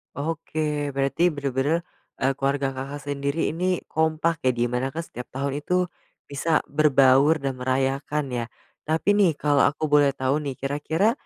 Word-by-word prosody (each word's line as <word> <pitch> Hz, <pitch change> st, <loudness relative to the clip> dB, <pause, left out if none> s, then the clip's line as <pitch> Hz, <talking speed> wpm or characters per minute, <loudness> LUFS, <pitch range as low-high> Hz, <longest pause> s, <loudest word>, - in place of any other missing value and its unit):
Oke, 150 Hz, -1 st, -2 dB
berarti 140 Hz, +6 st, +2 dB
benar-benar, 140 Hz, +3 st, 0 dB, 0.4 s
eee, 135 Hz, +1 st, +3 dB
keluarga 135 Hz, 0 st, 0 dB
Kakak 135 Hz, +2 st, -6 dB
sendiri 140 Hz, +2 st, -1 dB
ini 180 Hz, +2 st, -1 dB
kompak 160 Hz, 0 st, +1 dB
ya, 130 Hz, -, +5 dB
di 120 Hz, -, 0 dB
mana 125 Hz, +2 st, 0 dB
kan 165 Hz, +1 st, -3 dB
setiap 125 Hz, -5 st, -9 dB
tahun 140 Hz, +2 st, -2 dB
itu, 180 Hz, +4 st, +1 dB, 0.4 s
bisa 150 Hz, +3 st, 0 dB
berbaur 140 Hz, 0 st, +5 dB
dan 135 Hz, -1 st, -1 dB
merayakan 135 Hz, +3 st, 0 dB
ya? 120 Hz, -1 st, -2 dB, 0.4 s
Tapi 160 Hz, +6 st, +2 dB
nih, 185 Hz, -7 st, +4 dB
kalau 145 Hz, -1 st, +2 dB
aku 145 Hz, +2 st, -3 dB
boleh 145 Hz, -2 st, +4 dB
tahu 130 Hz, +2 st, 0 dB
nih 135 Hz, -2 st, -4 dB
kira-kira, 155 Hz, +9 st, 0 dB
145 Hz, 155 wpm, -24 LUFS, 135-160 Hz, 0.4 s, ya